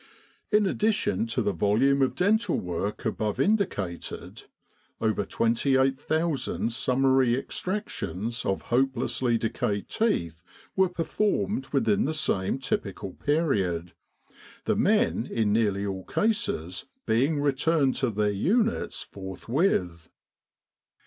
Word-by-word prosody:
In 210 -1 +4
addition 200 - +1
to 120 +1 -1
the 100 -1 0
volume 115 +10 +2
of 130 - +2
dental 215 +5 +2
work 90 +4 -4
above 105 -2 -1
indicated, 170 - -1 0.5
over 110 -2 +1
28,000 135 - 0
summary 130 0 +3
extractions 120 - -3
of 95 - -1
hopelessly 125 -1 +1
decayed 105 -2 -2
teeth 85 - 0 0.3
were 190 -1 +3
performed 180 -2 -1
within 175 +10 +2
the 155 - -1
same 95 -8 0
typical 100 -7 -3
period, 100 - 0 0.7
the - - +2
men - - +2
in 110 -3 0
nearly 100 -3 +1
all 95 -1 -4
cases 200 - -1 0.2
being 140 +7 +2
returned 145 0 +2
to 130 -3 +1
their 105 -1 0
units 220 - 0
forth 95 -1 -9
with. 90 - 0
125 Hz, 110 wpm, -27 LUFS, 100-160 Hz, 0.7 s, In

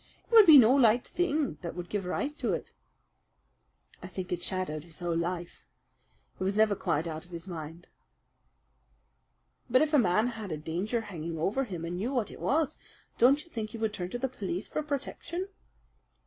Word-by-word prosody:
It - - -31
would 440 -4 +9
be 310 -3 +11
no 245 -1 +7
light 245 -3 +4
thing 305 - -1
that 170 -2 -5
would 175 -1 -5
give 200 0 -3
rise 280 +10 -2
to - - 0
it." - - -4 1.3
"I - - -7
think 185 0 -6
it 175 -1 -1
shadowed 175 -5 -2
his 165 -1 -8
whole 175 -1 -1
life. 170 +1 -3 0.8
It - - -2
was 195 +1 0
never 215 -1 +4
quite 155 -3 -1
out 160 -1 -5
of 175 - -19
his 170 -1 -7
mind." 165 -1 -7 1.8
"But 255 +4 +5
if 310 0 -2
a 295 - +6
man 205 0 +3
had 220 -5 -6
a 155 - -2
danger 180 +10 -2
hanging 170 -6 -6
over 210 +12 0
him, 175 -7 -5
and 175 +1 -4
knew 235 +9 -2
what 230 -5 0
it - - -11
was, 305 -1 0 0.4
don't 275 +5 +5
you 340 - -23
think 220 -2 -4
he 230 - -8
would 220 -1 -1
turn 180 -3 -4
to 245 - -3
the 265 +2 -1
police 200 -6 -4
for - - -2
protection?" 305 +5 -4
205 Hz, 195 wpm, -29 LUFS, 175-255 Hz, 1.8 s, be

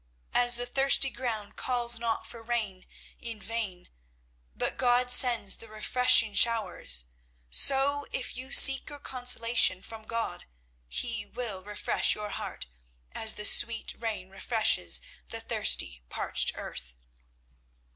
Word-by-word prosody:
As 245 0 +2
the 245 +1 -4
thirsty 270 +1 +2
ground 225 -5 -6
calls 240 -2 -2
not 230 -1 -4
for 235 - -12
rain 220 -5 -5 0.3
in 230 -2 -8
vain, 210 -4 -7 0.7
but - - -4
God 250 0 +1
sends 240 -5 +6
the 225 - -13
refreshing 220 0 +2
showers, 215 - 0 0.5
so 280 - +3
if 250 -1 -5
you 255 +1 -8
seek 270 -1 +7
your 290 - -10
consolation 245 -7 +1
from 220 -1 -12
God, 230 +1 -6 0.4
He 210 - -5
will 220 -6 -5
refresh 205 +1 0
your 210 0 -7
heart - - -7 0.5
as 220 -1 +1
the 210 - -6
sweet 230 0 +3
rain 210 -5 -7
refreshes 195 - +2 0.3
the - - -6
thirsty - - -1
parched - - 0
earth. 60 0 -10
230 Hz, 125 wpm, -27 LUFS, 210-245 Hz, 0.7 s, seek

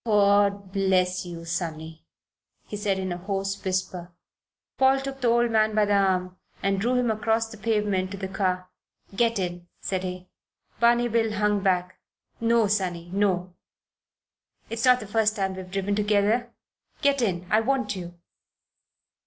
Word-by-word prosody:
"God 200 -2 +3
bless 185 -2 +1
you, 165 -1 -8
sonny," 160 -1 -5 0.6
he - - -7
said 205 -2 0
in 190 -1 -3
a 175 - -4
hoarse 195 +1 -3
whisper. 185 -2 -3 0.7
Paul 265 0 +5
took 270 0 -6
the 245 - +2
old 235 0 +3
man 215 -1 +2
by 215 -1 +4
the 205 - +1
arm 185 -2 +1 0.3
and 195 0 +1
drew 245 +4 +1
him 245 -2 +2
across 225 +1 0
the 220 - -10
pavement 205 -3 0
to 200 - -6
the 190 0 -4
car. 185 -1 -2 0.4
"Get 230 +1 +2
in," 175 -2 -4
said 190 -1 -2
he. 185 0 -6 0.5
Barney 240 0 +4
Bill 225 -1 +1
hung 210 0 +1
back. 185 -1 0 0.4
"No, 230 -1 +3
sonny; 180 -4 -1
no." 185 -3 0 1.2
"It's 230 +1 -1
not 250 -1 +5
the - - -6
first 215 +1 +1
time 195 -2 -1
we've 185 -1 -8
driven 195 +1 -1
together. 210 +3 +1 0.5
Get 280 -1 +3
in. 180 -6 -1
I 215 - +5
want 260 0 0
you." 175 -1 -8
200 Hz, 160 wpm, -25 LUFS, 185-225 Hz, 1.2 s, Paul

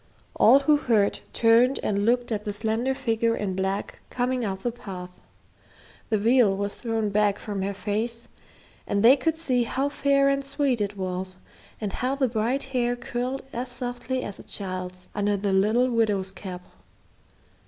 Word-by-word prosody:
All 275 - +6
who 295 +1 +4
heard 220 -7 +2
turned 235 +3 +4
and 200 0 0
looked 240 +1 +2
at 210 -2 -1
the 205 - -3
slender 225 +5 -1
figure 230 -3 +1
in 190 -3 -2
black 190 +1 -2
coming 250 0 -1
up 195 -3 -3
the 240 - 0
path. 185 -6 -8 1.0
The 220 - +2
veil 220 -2 +4
was 200 0 -2
thrown 225 -3 -2
back 205 -1 +2
from 205 -3 -4
her 200 +1 -2
face 225 +4 -2 0.6
and 200 +1 0
they 250 +4 +9
could 320 +4 -1
see 260 -7 +1
how 265 +4 0
fair 280 -1 +2
and 275 0 +1
sweet 275 -4 0
it 205 0 -2
was, 185 0 -3 0.4
and 210 -3 -3
how 255 +2 -1
the 275 -2 +2
bright 235 +4 0
hair 245 -1 +1
curled 245 +2 -3
as 250 +2 -3
softly 245 +1 -4
as 200 - -6
a - - -10
child's 185 -2 -5
under 205 0 +1
the 200 0 -1
little 220 +6 +3
widow's 205 -5 +1
cap. 185 -2 -8
225 Hz, 170 wpm, -25 LUFS, 200-250 Hz, 1.0 s, they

